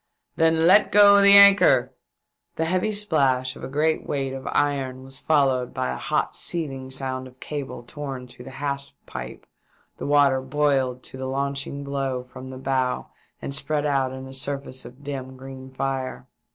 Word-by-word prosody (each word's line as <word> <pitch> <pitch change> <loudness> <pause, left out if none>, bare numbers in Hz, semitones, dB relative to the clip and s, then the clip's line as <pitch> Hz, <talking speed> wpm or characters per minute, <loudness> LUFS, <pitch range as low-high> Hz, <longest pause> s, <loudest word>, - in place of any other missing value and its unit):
" - - -56
Then 160 0 +3
let 190 +4 +5
go 200 0 +7
the 200 0 +8
anchor 195 -11 +6 0.3
!" - - -55
The 160 - -1
heavy 185 +5 0
splash 135 -11 +1
of - - -12
a - - -4
great 155 +3 0
weight 135 -2 -2
of 135 0 -7
iron 135 -3 -1
was 135 0 -13
followed 135 -5 +1
by 65 - -1
a - - -3
hot - - -1
seething 135 -6 -3
sound 130 -1 -4
of 130 0 -18
cable 140 -5 -6
torn 135 -1 -7
through 125 0 -13
the 135 - -9
hawse 140 0 -4
pipe; - - -8 0.5
the - - -5
water 140 -2 +4
boiled 135 -2 0
to - - -10
the 130 - -4
launching 140 +1 -3
blow 135 -2 -3
from 130 +1 -11
the 130 0 -8
bow 130 -1 -1 0.3
and 140 - -4
spread 150 +1 -1
out 135 -3 +1
in 130 0 -7
a 130 - -10
surface 135 -1 -3
of 130 +3 -13
dim 130 -2 -6
green 130 0 -10
fire. 130 -1 -4
135 Hz, 180 wpm, -24 LUFS, 130-145 Hz, 0.5 s, the